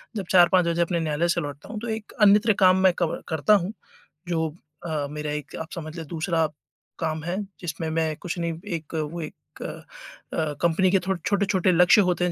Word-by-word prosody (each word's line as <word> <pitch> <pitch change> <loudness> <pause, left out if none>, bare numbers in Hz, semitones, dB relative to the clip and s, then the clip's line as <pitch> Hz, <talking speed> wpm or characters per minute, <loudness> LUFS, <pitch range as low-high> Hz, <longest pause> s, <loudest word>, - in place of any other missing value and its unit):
जब 195 -4 -3
4-5 180 -1 +6
बजे 170 0 +1
अपने 170 0 +1
न्यायालय 160 +1 0
से - - +1
लौटता 145 +3 -7
हूँ 215 -1 -5
तो 235 - -6
एक 220 -1 -5
अन्यत्र 210 +2 +6
काम 185 -1 +6
मैं 185 -2 +6
कब 170 -2 -1
करता 160 +6 +2
हूँ 190 +1 0 0.6
जो 160 -2 0 0.4
अ, 150 -3 -2
मेरा 150 0 -4
एक 150 -1 -5
आप 160 - -6
समझ 155 0 -7
लें 165 - -5
दूसरा 165 -1 0 0.5
काम 160 -1 -2
है 175 +3 -2 0.2
जिसमें 165 -2 -4
मैं 160 -1 0
कुछ 180 0 -5
नहीं 170 -1 -1 0.2
एक 160 0 -7
वो 160 +2 -3
एक 155 - -11
अ, - - -7 0.8
कंपनी 170 +2 +3
के 195 - +4
थोड़ 190 -2 +1
छोटे-छोटे 195 -2 +2
लक्ष्य 180 +5 +6
होते 175 0 0
हैं 175 - 0
170 Hz, 200 wpm, -25 LUFS, 160-185 Hz, 0.8 s, 4-5